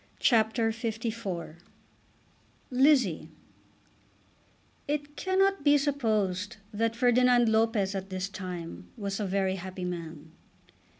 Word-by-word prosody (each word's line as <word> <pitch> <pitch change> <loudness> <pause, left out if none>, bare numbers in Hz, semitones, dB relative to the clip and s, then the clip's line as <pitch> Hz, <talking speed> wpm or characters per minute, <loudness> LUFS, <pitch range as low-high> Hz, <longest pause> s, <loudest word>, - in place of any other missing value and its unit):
CHAPTER 225 -1 +3
LIV 220 -8 -4 1.1
Lizzie 260 - +3 1.6
It 290 0 -3
cannot 385 -2 +1
be 290 0 +6
supposed 220 -7 0 0.2
that 225 +2 0
Ferdinand 245 -1 +4
Lopez 220 -3 +2
at 195 0 -5
this 185 0 -3
time 175 - -7
was 200 0 -3
a 205 - -1
very 190 0 0
happy 185 0 -6
man. 165 -3 -6
220 Hz, 100 wpm, -29 LUFS, 185-245 Hz, 1.6 s, be